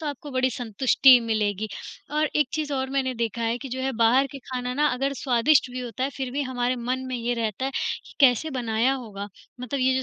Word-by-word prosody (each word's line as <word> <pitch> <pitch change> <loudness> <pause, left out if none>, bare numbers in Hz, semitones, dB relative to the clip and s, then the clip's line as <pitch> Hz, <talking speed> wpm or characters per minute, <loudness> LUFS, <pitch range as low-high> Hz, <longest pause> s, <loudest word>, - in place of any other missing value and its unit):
तो 310 - -5
आपको 290 0 -6
बड़ी 260 0 +1
संतुष्टि 250 +2 +5
मिलेगी। 215 -2 -1 0.4
और 305 +1 +1
एक 300 -4 +2
चीज़ 300 -2 -2
और 265 0 -2
मैंने 265 -2 0
देखा 230 0 -2
है 230 +2 0
कि 270 - -7
जो 260 +1 -4
है 265 0 -1
बाहर 240 +4 +4
के 275 - -7
खाना 250 0 -3
ना 300 +2 +2
अगर 275 +2 -1
स्वादिष्ट 260 +1 +3
भी 255 0 -5
होता 245 +1 -4
है 275 - -1
फ़िर 265 -2 -3
भी 285 +1 -1
हमारे 250 -1 -1
मन 255 +2 -2
में 255 -1 -3
ये 240 +1 -1
रहता 225 +2 -2
है, 270 - -1
कि - - -4
कैसे 270 +4 +4
बनाया 240 -1 +1
होगा? 205 -5 -7 0.3
मतलब 255 +2 -3
ये 260 0 +3
जो 260 - 0
255 Hz, 235 wpm, -25 LUFS, 235-270 Hz, 0.4 s, संतुष्टि